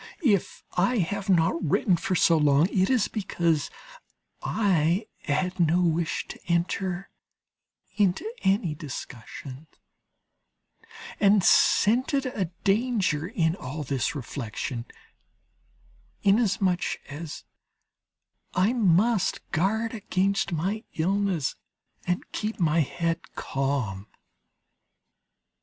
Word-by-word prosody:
If 205 Hz, -8 st, +1 dB
I 195 Hz, +8 st, +2 dB
have 200 Hz, +2 st, -2 dB
not 170 Hz, -2 st, +3 dB
written 175 Hz, +4 st, +2 dB
for 185 Hz, +2 st, -1 dB
so 170 Hz, -1 st, +4 dB
long, 150 Hz, +1 st, +4 dB
it 190 Hz, 0 st, +2 dB
is 255 Hz, -5 st, +3 dB
because 170 Hz, -7 st, 0 dB, 0.7 s
I 185 Hz, -2 st, +1 dB, 0.2 s
had 180 Hz, +6 st, -1 dB
no 170 Hz, +1 st, +3 dB
wish 165 Hz, -1 st, 0 dB
to -, -, -8 dB
enter 175 Hz, +2 st, -1 dB, 0.9 s
into 200 Hz, -, +2 dB, 0.2 s
any 190 Hz, -4 st, +1 dB
discussion, 140 Hz, -1 st, -8 dB, 1.5 s
and 200 Hz, -1 st, +5 dB
scented 255 Hz, -, +4 dB
a 225 Hz, -7 st, -1 dB, 0.2 s
danger 200 Hz, -, +1 dB
in 165 Hz, -5 st, 0 dB
all 150 Hz, -1 st, -6 dB
this 135 Hz, +1 st, -1 dB
reflection, 120 Hz, -2 st, -5 dB, 1.4 s
inasmuch 195 Hz, -3 st, +2 dB, 0.2 s
as 150 Hz, +2 st, -7 dB, 1.1 s
I 190 Hz, +6 st, +3 dB
must 205 Hz, -1 st, +2 dB
guard 220 Hz, +8 st, 0 dB
against 195 Hz, -2 st, 0 dB
my 190 Hz, +7 st, -2 dB
illness 185 Hz, -2 st, 0 dB, 0.5 s
and 180 Hz, 0 st, 0 dB
keep 215 Hz, 0 st, -3 dB
my 165 Hz, -1 st, +3 dB
head 165 Hz, +2 st, -2 dB
calm. 130 Hz, -8 st, -2 dB
180 Hz, 95 wpm, -26 LUFS, 155-200 Hz, 1.5 s, and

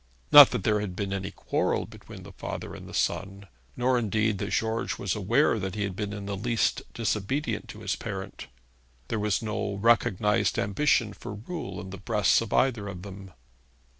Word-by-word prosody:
Not 145 Hz, -2 st, +11 dB
that 125 Hz, -6 st, -3 dB
there 105 Hz, +1 st, +2 dB
had 100 Hz, -3 st, -4 dB
been 100 Hz, -1 st, -3 dB
any 95 Hz, 0 st, -3 dB
quarrel -, -, -1 dB
between -, -, -12 dB
the -, -, -11 dB
father -, -, -6 dB
and -, -, -10 dB
the -, -, -11 dB
son; 100 Hz, +1 st, -1 dB, 0.3 s
nor 125 Hz, 0 st, +2 dB
indeed 110 Hz, -2 st, 0 dB
that 100 Hz, -, -3 dB
George 110 Hz, +1 st, -1 dB
was 100 Hz, -, -1 dB
aware 115 Hz, +5 st, +2 dB
that 95 Hz, 0 st, -4 dB
he 105 Hz, -, -1 dB
had 95 Hz, -2 st, -3 dB
been 105 Hz, 0 st, -3 dB
in 100 Hz, -1 st, -6 dB
the 100 Hz, 0 st, -3 dB
least 115 Hz, +3 st, 0 dB
disobedient 115 Hz, +6 st, -2 dB
to -, -, -9 dB
his -, -, -1 dB
parent. 95 Hz, -7 st, -6 dB, 0.6 s
There 110 Hz, -, -1 dB
was 105 Hz, +1 st, 0 dB
no 105 Hz, -2 st, -2 dB
recognised 105 Hz, -1 st, +2 dB
ambition 105 Hz, 0 st, +1 dB
for 105 Hz, -, -8 dB
rule 160 Hz, -, -6 dB
in 95 Hz, -, -8 dB
the 100 Hz, -, -8 dB
breasts 105 Hz, -1 st, +2 dB
of 115 Hz, -, -5 dB
either 115 Hz, -6 st, +2 dB
of 90 Hz, -3 st, -7 dB
them. 95 Hz, -1 st, -9 dB
105 Hz, 190 wpm, -27 LUFS, 100-115 Hz, 0.6 s, Not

